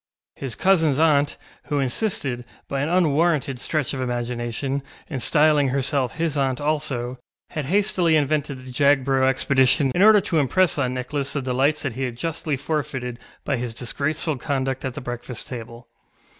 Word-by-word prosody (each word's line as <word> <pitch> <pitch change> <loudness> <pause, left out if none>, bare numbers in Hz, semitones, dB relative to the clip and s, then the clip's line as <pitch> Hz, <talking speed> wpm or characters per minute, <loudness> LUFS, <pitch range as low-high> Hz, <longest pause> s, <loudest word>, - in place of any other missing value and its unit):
His 135 -4 -4
cousinsŌĆÖ 165 -7 +3
aunt, 150 -3 +3 0.3
who 145 - -1
insisted, 135 - -1 0.2
by 135 -1 -2
an 145 - -1
unwarranted 155 -5 +2
stretch 150 0 -1
of 130 - -3
imagination, 120 +2 -2 0.3
in 140 -5 -4
styling 150 +1 +4
herself 135 -1 0
his 160 -2 -1
aunt 135 -2 0
also, 135 -5 -2 0.3
had 150 -3 -3
hastily 180 -1 +2
invented 145 -1 0
the 130 - -8
Jagborough 135 -1 +3
expedition 135 +1 +3
in 180 - +1
order 215 +1 +8
to 170 -4 0
impress 155 +3 +2
on 130 -2 0
Nicholas 140 +2 -2
the 145 - -1
delights 135 +4 +1
that 140 -5 -2
he 130 - -6
had 125 -3 -2
justly 155 0 -2
forfeited 130 -4 -3 0.3
by 140 - 0
his 120 -1 -4
disgraceful 145 +5 -2
conduct 135 0 -2
at 130 -2 -4
the 150 - -5
breakfast 120 -1 -6
table. 120 -1 -8
140 Hz, 160 wpm, -23 LUFS, 125-155 Hz, 0.3 s, order